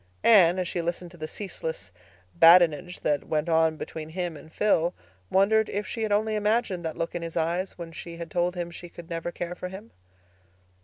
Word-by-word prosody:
Anne, 185 -5 +6
as 185 -1 -1
she 170 - -2
listened 175 +1 -4
to - - -13
the 155 -1 -5
ceaseless 160 - -6 0.4
badinage 170 0 +5
that 145 -2 0
went 155 +1 0
on 160 -1 +3
between 155 0 -7
him 175 0 -3
and 155 +2 -13
Phil, 175 -3 +1 0.3
wondered 215 +3 +3
if 205 0 -2
she 225 - -5
had 215 -1 -1
only 215 +1 +2
imagined 210 -3 0
that 160 -1 -4
look 165 - -3
in 175 - -3
his 165 0 -5
eyes 170 +4 -1
when 170 -2 -7
she 170 +1 -8
had 170 -1 -7
told 175 +1 0
him 175 -1 -4
she 175 0 -10
could 170 0 -12
never 165 +1 -3
care 175 0 -5
for 180 - -6
him. 195 +5 -10
175 Hz, 205 wpm, -26 LUFS, 165-190 Hz, 0.4 s, Anne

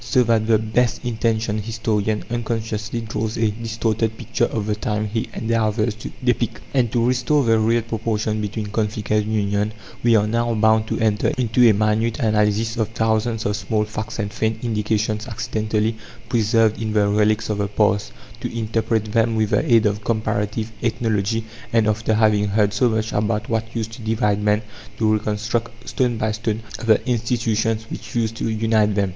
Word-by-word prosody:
So 120 +3 +3
that 115 -2 +2
the 115 -1 +5
best 115 +3 0
intentioned 110 -2 0
historian 110 -1 -1
unconsciously 115 -1 -2
draws 110 0 -3
a 110 -2 +2
distorted 110 0 -2
picture 120 +1 0
of 110 -3 -3
the 105 - 0
times 105 0 -2
he 110 - -1
endeavours 110 -1 0
to 110 - -7
depict; 120 -3 0
and, 125 -5 +2
to 120 -1 +1
restore 125 +4 +2
the 115 -2 +3
real 115 +1 +2
proportion 110 -1 -2
between 105 +1 -3
conflict 105 -1 -2
and 105 0 +1
union, 105 0 0 0.3
we 120 -1 +4
are 105 -1 +4
now 115 +1 0
bound 110 0 +3
to - - -2
enter 105 -2 +1
into 120 -1 +4
a - - +5
minute 110 +2 +1
analysis 110 -1 +1
of 110 -2 +1
thousands 110 0 0
of 105 - 0
small 105 0 -1
facts 110 +1 -5
and 105 -2 -3
faint 110 0 -1
indications 110 0 -1
accidentally 110 -1 -1 0.3
preserved 110 -1 +2
in 110 -1 -2
the 105 -1 +3
relics 105 +1 +2
of 105 - -2
the 100 - 0
past; 105 0 +1 0.3
to - - -4
interpret 110 0 0
them 115 +1 +2
with 110 -1 +1
the - - +3
aid 115 -2 +6
of 105 0 0
comparative 110 0 -1
ethnology; 110 -1 0 0.3
and, 115 -2 +3
after 110 +1 +1
having 105 -2 +3
heard 105 0 +2
so 120 +4 +3
much 110 0 -1
about 105 +1 0
what 115 0 -2
used 110 -1 -2
to 115 - -9
divide 105 -2 0
men, 105 +1 +2 0.3
to 110 -1 +2
reconstruct 110 +2 -2
stone 125 -3 0
by 110 0 0
stone 110 0 -2 0.3
the 110 - +6
institutions 115 -2 0
which - - -7
used 115 -1 0
to 115 - -2
unite 110 -1 +2
them. 100 -2 +1
110 Hz, 180 wpm, -21 LUFS, 105-115 Hz, 0.3 s, aid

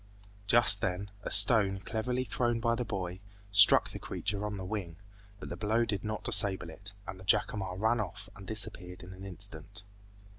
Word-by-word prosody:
Just 115 -3 +3
then, 95 +2 -4
a - - -7
stone 100 -1 +6
cleverly 125 +6 -4
thrown 120 -2 -2
by 115 0 -1
the 120 +1 -3
boy, 95 -5 -6 0.3
struck 100 -1 +7
the - - -9
creature 105 -1 -5
on 105 -1 -7
the 95 - -8
wing, 95 -4 -6 0.4
but - - -10
the - - -6
blow 110 +2 -1
did 100 -4 -5
not 110 0 -6
disable 95 -4 +2
it, 100 +5 -11
and 95 - -9
the - - -13
jacamar 95 0 -1
ran 110 +4 -1
off 105 0 -7
and 95 -1 -14
disappeared 90 -4 -4
in 90 +1 -12
an 95 +1 -12
instant. 95 0 -12
100 Hz, 185 wpm, -29 LUFS, 95-110 Hz, 0.4 s, struck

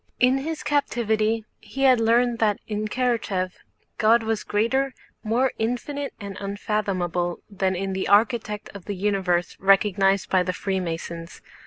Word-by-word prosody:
In 255 +2 +4
his 315 +3 -4
captivity 225 -6 0
he 270 - -5
had 260 -3 +6
learned 235 +1 +3
that 210 -2 +2
in 215 0 -2
Karatáev 210 -6 0 0.5
God 225 +1 +5
was 220 -1 -1
greater, 260 +6 0 0.3
more 240 +4 +1
infinite 260 +5 -2
and 200 -2 -7
unfathomable 195 -4 -2
than 190 -1 0
in 195 +1 -2
the 190 - -2
Architect 210 0 +2
of 200 -3 -10
the 205 - -4
Universe 190 -3 0
recognized 195 0 +3
by 185 - +3
the 185 0 -1
Freemasons. 170 -3 -4
210 Hz, 140 wpm, -24 LUFS, 190-235 Hz, 0.5 s, had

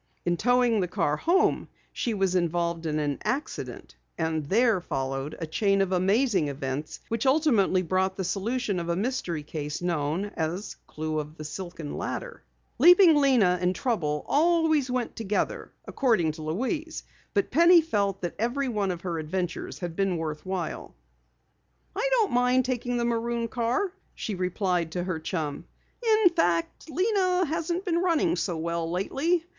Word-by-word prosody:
In 175 0 +2
towing 245 +1 +3
the 180 - 0
car 150 -4 0
home 345 - +2 0.3
she 235 -3 -2
was 195 -2 +1
involved 170 -1 0
in 155 -1 -1
an 145 -2 -1
accident, 285 +4 -4 0.2
and 160 -1 -1
there 225 -2 +3
followed 135 -2 -3
a 165 - -4
chain 195 +5 +1
of 195 -1 +1
amazing 190 - +2
events 140 +1 -4
which 230 +2 -1
ultimately 240 - +3
brought 190 +2 0
the 190 - -2
solution 205 +1 -1
of 170 0 -4
a 170 - +1
mystery 190 - -2
case 150 -1 -5
known 175 +3 -1
as 170 +5 -3
Clue 155 0 -3
of 150 +1 -7
the 155 - -7
Silken 170 -1 -6
Ladder. - - -5 0.4
Leaping 355 -1 +8
Lena 245 -11 +4
and 180 +1 +1
trouble 155 - -1
always 315 -3 +3
went 250 -1 -2
together, 210 -2 -2
according 220 - +1
to 155 +1 -10
Louise, 260 - -3 0.3
but 200 - +1
Penny 340 +5 +7
felt 200 - -1
that 175 - -3
every 255 +4 0
one 205 -4 -1
of 175 -2 -3
her 170 -3 -3
adventures 175 +2 -3
had 175 -3 -5
been 195 -2 0
worth 155 -2 -4
while. 185 -4 -4 1.0
"I 435 +6 0
don't 455 -5 +3
mind 250 +1 +3
taking 245 -1 -1
the 235 - 0
maroon 235 0 -1
car," 245 - -1 0.2
she 215 - -4
replied 180 -2 -1
to 175 - -2
her 180 -3 -3
chum. 155 -3 -4 0.4
"In 435 -4 +5
fact, 175 - 0
Lena 370 +1 +2
hasn't 335 +4 -2
been 340 -2 +1
running 345 -1 +2
so 175 -4 -2
well 170 0 -2
lately. 290 - 0
195 Hz, 160 wpm, -27 LUFS, 170-265 Hz, 1.0 s, Leaping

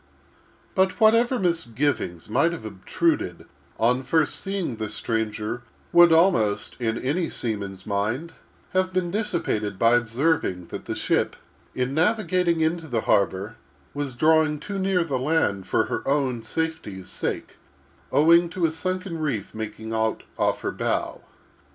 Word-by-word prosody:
But 190 +2 +1
whatever 230 +3 +5
misgivings 145 - -1
might 140 +10 +2
have 115 - -7
obtruded 100 -3 -1 0.3
on 125 +3 +3
first 155 +3 +1
seeing 190 - -3
the 110 -1 -3
stranger, 110 +1 -2 0.3
would 175 -1 +7
almost, 135 - +3
in 115 -1 0
any 160 +7 -1
seaman's 100 -4 -4
mind, 110 +11 -1 0.4
have 185 0 +1
been 180 -2 0
dissipated 170 - -1
by 115 +2 +4
observing 120 - +1
that, - - -7
the - - -3
ship, - - 0 0.4
in 125 +1 -1
navigating 180 -1 +2
into 160 +1 0
the 120 -5 -1
harbor, 100 +1 +1 0.4
was 145 -3 -4
drawing 155 +2 +3
too 195 +6 -5
near 190 -2 +2
the 140 -6 -2
land; 130 - +1
a - - +1 2.7
sunken 185 +1 -3
reef 135 -10 -2
making 110 0 -6
out 110 0 0
off - - 0
her - - -2
bow. - - -2
140 Hz, 120 wpm, -24 LUFS, 110-170 Hz, 2.7 s, would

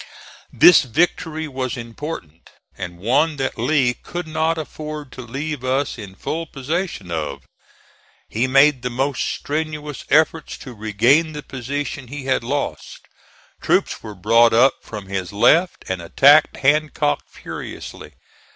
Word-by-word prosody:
This 175 +3 +7
victory 160 +3 0
was 130 -2 -4
important, 115 - -8 0.3
and 85 -1 -7
one 135 - +2
that 135 -2 -3
Lee 135 -6 +2
could 175 +7 -7
not 160 +1 0
afford 155 -2 -6
to - - -8
leave 135 +3 -5
us 130 +2 0
in 100 -5 -10
full 165 - -4
possession 150 - -4
of. 75 -4 -3 0.8
He 120 +4 0
made 135 0 +5
the 125 - -2
most 135 +3 -1
strenuous 150 -2 -3
efforts 160 +1 +2
to 130 - -10
regain 120 +9 +2
the 150 -1 -6
position 140 +1 -5
he 140 +1 -7
had 130 -3 +1
lost. 140 +4 -4 0.6
Troops - - +1
were 105 -2 -8
brought 115 +4 +4
up 125 +4 +5
from 105 -3 -8
his 95 -2 -4
left 165 - +3
and 95 -2 -3
attacked 140 - +5
Hancock 145 - +1
furiously. - - -9
135 Hz, 135 wpm, -21 LUFS, 115-155 Hz, 0.8 s, This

